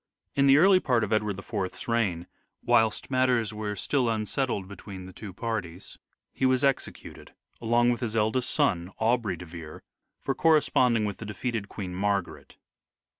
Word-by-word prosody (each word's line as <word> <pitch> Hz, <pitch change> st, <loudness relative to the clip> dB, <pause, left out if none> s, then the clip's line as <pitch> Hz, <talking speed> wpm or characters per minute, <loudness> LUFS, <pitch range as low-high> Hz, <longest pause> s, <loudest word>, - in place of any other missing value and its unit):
In 140 Hz, 0 st, +3 dB
the 135 Hz, +1 st, +7 dB
early 185 Hz, +3 st, +6 dB
part 125 Hz, -9 st, +1 dB
of 105 Hz, -, -1 dB
Edward 105 Hz, -2 st, 0 dB
IV's 100 Hz, -2 st, -5 dB
reign, 105 Hz, -8 st, 0 dB, 0.4 s
whilst 110 Hz, +3 st, +2 dB
matters 125 Hz, -4 st, +2 dB
were 105 Hz, -1 st, -4 dB
still 125 Hz, +4 st, +1 dB
unsettled 110 Hz, -1 st, -1 dB
between 95 Hz, -1 st, -9 dB
the 95 Hz, -, -11 dB
two 105 Hz, 0 st, -8 dB
parties, 100 Hz, -4 st, -5 dB, 0.3 s
he -, -, -6 dB
was 130 Hz, +1 st, +3 dB
executed 135 Hz, -1 st, -3 dB, 0.3 s
along 120 Hz, +1 st, +3 dB
with 120 Hz, -, -3 dB
his 115 Hz, -2 st, -3 dB
eldest 115 Hz, +3 st, +1 dB
son, 85 Hz, 0 st, +1 dB
Aubrey 110 Hz, -5 st, +1 dB
de 90 Hz, -, -9 dB
Vere, 80 Hz, -2 st, -10 dB, 0.4 s
for 135 Hz, -, -2 dB
corresponding 130 Hz, -7 st, +3 dB
with 100 Hz, -2 st, -4 dB
the 115 Hz, -, -8 dB
defeated 105 Hz, 0 st, -3 dB
Queen 95 Hz, -4 st, -6 dB
Margaret. 100 Hz, -1 st, -2 dB
110 Hz, 160 wpm, -27 LUFS, 100-125 Hz, 0.4 s, the